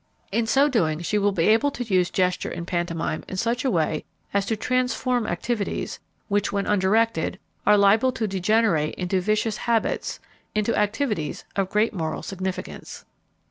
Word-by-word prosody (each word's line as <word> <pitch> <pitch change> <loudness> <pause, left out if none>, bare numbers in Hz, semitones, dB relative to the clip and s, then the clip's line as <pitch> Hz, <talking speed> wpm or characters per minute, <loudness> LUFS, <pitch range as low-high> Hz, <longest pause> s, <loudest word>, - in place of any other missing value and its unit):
In 225 +2 +1
so 275 +5 +4
doing 170 - +1
she 210 +5 0
will 205 0 +2
be 170 -4 +1
able 225 +6 +4
to 255 - -4
use 185 -6 +2
gesture 180 -1 0
and 170 0 -5
pantomime 170 -3 -2
in 190 - -5
such 235 +7 0
a 270 - +2
way 160 -6 0 0.3
as 200 0 +1
to 225 - +1
transform 250 -1 0
activities, 210 +4 -2 0.3
which 205 -1 +1
when 200 -1 -1
undirected 210 -2 +2 0.3
are 210 0 +7
liable 210 +6 +5
to 220 -2 -1
degenerate 190 -5 +1
into 185 +1 -1
vicious 215 +3 0
habits, 230 -1 0 0.4
into 215 +2 +1
activities 210 - -1
of 195 -2 0
great 210 +3 +2
moral 160 -4 -3
significance. 190 -1 -5
205 Hz, 160 wpm, -24 LUFS, 180-225 Hz, 0.4 s, are